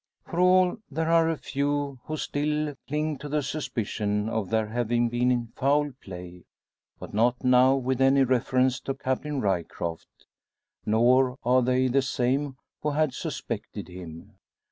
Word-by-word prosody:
For 170 - -4
all, 180 +1 +4
there 160 +3 -1
are 165 -1 +4
a 165 - -1
few 140 -1 -2
who 155 - -4
still 150 0 -1
cling 150 0 -2
to 150 - -7
a 150 - 0
suspicion 105 -7 -2
of 110 -4 -2
there 110 -1 +1
having 120 +1 0
been 120 0 +1
foul 145 +2 +2
play; 90 -1 -10 0.5
but - - -10
not 120 +4 +2
now 125 +1 +5
with 130 -1 -1
any 135 +1 +5
reference 130 0 +2
to 135 - -4
Captain 135 +2 -2
Ryecroft. 85 -3 -3 0.6
Nor 125 +4 +3
are 125 +1 +4
they 130 +1 +2
the 135 +2 +2
same 135 +1 -1 0.3
who 150 - 0
had 150 -2 +1
suspected 115 - -5
him. 90 +2 -11
130 Hz, 145 wpm, -26 LUFS, 115-145 Hz, 0.6 s, now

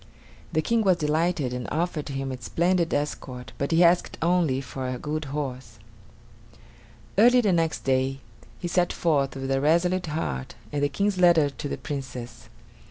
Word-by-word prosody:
The 155 - +1
King 230 +4 +2
was 190 -4 +3
delighted 155 -3 0
and 125 -1 -4
offered 160 -3 -2
him 135 -1 -3
a 130 -1 -7
splendid 170 +5 +1
escort, 135 -3 -3
but 140 - -1
he 165 +2 +5
asked 175 +1 +3
only 165 -6 +2
for 135 -1 -5
a 125 - -3
good 155 +3 -3
horse. 130 -5 -5 1.4
Early 245 +3 +7
the 210 -6 +2
next 165 -2 0
day 135 0 +1 0.4
he 175 - -4
set 175 0 +1
forth, 140 -5 +1
with 135 0 -4
a 135 0 +1
resolute 170 +4 +2
heart 70 - -3 0.2
and 145 - -2
the 145 - +2
King's 200 +6 0
letter 170 -5 +5
to 145 - -6
the - - -3
Princess. 130 -4 -7
150 Hz, 165 wpm, -26 LUFS, 135-175 Hz, 1.4 s, Early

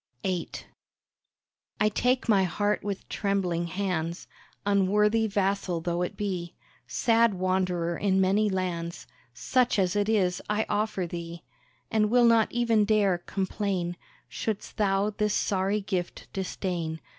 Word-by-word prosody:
VIII 185 -3 -1 1.3
I 210 - +4
take 250 +5 +1
my 205 -4 +5
heart 205 +3 0
with 200 -1 -4
trembling 180 -4 -1
hands, 175 -2 -2 0.4
Unworthy 210 +3 +3
vassal 195 -3 0
though 170 +1 -2
it 180 - -3
be, 185 -4 -3 0.3
Sad 230 -2 +3
wanderer 180 -2 0
in 195 -2 +2
many 200 +3 +3
lands, 175 -3 -3 0.3
Such 250 - +1
as 190 -1 +1
it 205 +1 +1
is 185 -5 +1
I 210 +1 +1
offer 205 -3 -1
thee, 170 0 -7 0.5
And 215 -1 +2
will 245 +1 +5
not 230 -2 +4
even 230 -3 +2
dare 205 -4 +2
complain 190 -1 -2 0.3
Shouldst 215 -2 -4
thou 200 0 +2
this 210 0 0
sorry 195 +2 0
gift 185 -3 -4
disdain. 180 -4 -3
195 Hz, 130 wpm, -27 LUFS, 180-210 Hz, 1.3 s, my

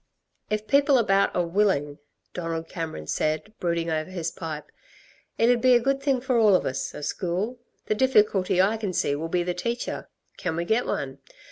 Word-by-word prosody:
"If 215 0 -1
people 280 +1 +4
about 200 -4 +2
are 175 - +2
willing," 170 -6 +1 0.3
Donald 165 -2 -4
Cameron 160 - -5
said, 155 - -1
brooding 170 -1 -1
over 155 +2 -2
his 170 -3 -3
pipe, 160 -4 -7 0.7
"it'd 235 +1 +3
be 255 -1 +6
a - - +6
good 275 +3 0
thing 275 -3 +1
for 255 -2 +1
all 210 -4 +6
of - - +1
us 130 +1 -3
a 150 - -7
school. 190 +10 -2 0.3
The - - +1
difficulty 210 -6 +3
I 200 +4 +3
can 205 -4 -3
see 145 - +1
will 160 +3 -4
be 175 +1 +1
the 180 0 -1
teacher. 235 +7 -4 0.3
Can 180 -4 -2
we 170 +1 -2
get 220 +7 +1
one? 135 -1 -3
185 Hz, 190 wpm, -25 LUFS, 165-230 Hz, 0.7 s, be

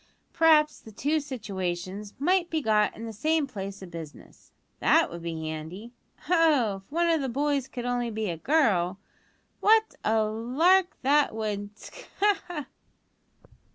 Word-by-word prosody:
"P'raps 305 -2 +4
the 220 - -13
two 290 +9 0
situations 200 -6 -5
might 350 +4 +1
be 320 - 0
got 215 -6 +2
in 225 - -7
the 225 - -6
same 310 +7 +1
place 195 -6 -7
o' - - -6
business; 165 -4 -11 0.3
that - - +3
would 170 0 -7
be 165 -1 -4
handy! 160 +9 -7 0.3
Oh! 300 - +3
if 195 +4 -18
one 340 +3 +1
o' 330 -1 +2
the 270 -2 -2
boys 280 +1 0
could 245 -2 -6
only 245 -1 -1
be 220 -1 -3
a 165 - -5
girl, 190 - +2 0.6
what 440 +1 +4
a 220 0 +2
lark 280 - +2
that 285 -2 +3
would 210 -1 -4
sk! - - -12
ha! 410 0 +3
ha!" 315 -6 -5
235 Hz, 155 wpm, -27 LUFS, 200-310 Hz, 0.6 s, P'raps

